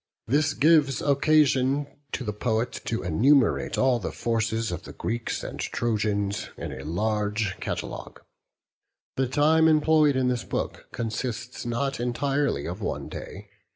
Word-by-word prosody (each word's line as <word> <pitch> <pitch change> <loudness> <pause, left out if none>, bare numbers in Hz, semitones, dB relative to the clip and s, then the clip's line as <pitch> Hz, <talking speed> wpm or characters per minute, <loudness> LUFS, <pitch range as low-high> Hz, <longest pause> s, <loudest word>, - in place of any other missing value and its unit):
This 145 +4 +1
gives 150 -3 +4
occasion 140 -1 +3 0.3
to - - -2
the 105 -3 -3
poet 115 +3 -1
to 115 - -2
enumerate 120 - +3
all 130 -2 +3
the - - -4
forces 115 -2 -1
of 85 0 -4
the - - -11
Greeks 115 +1 -3
and - - -6
Trojans, 105 -3 -1
in - - -5
a 65 0 -7
large 105 +4 -1
catalogue. - - -5 1.0
The 130 0 +1
time 155 +4 +4
employed 155 -2 +4
in 130 -1 +2
this 125 -2 0
book - - -4
consists 120 +2 -4
not 125 +3 -1
entirely 130 - 0
of 90 +5 -5
one - - -3
day. 100 +2 -9
120 Hz, 140 wpm, -26 LUFS, 105-140 Hz, 1.0 s, gives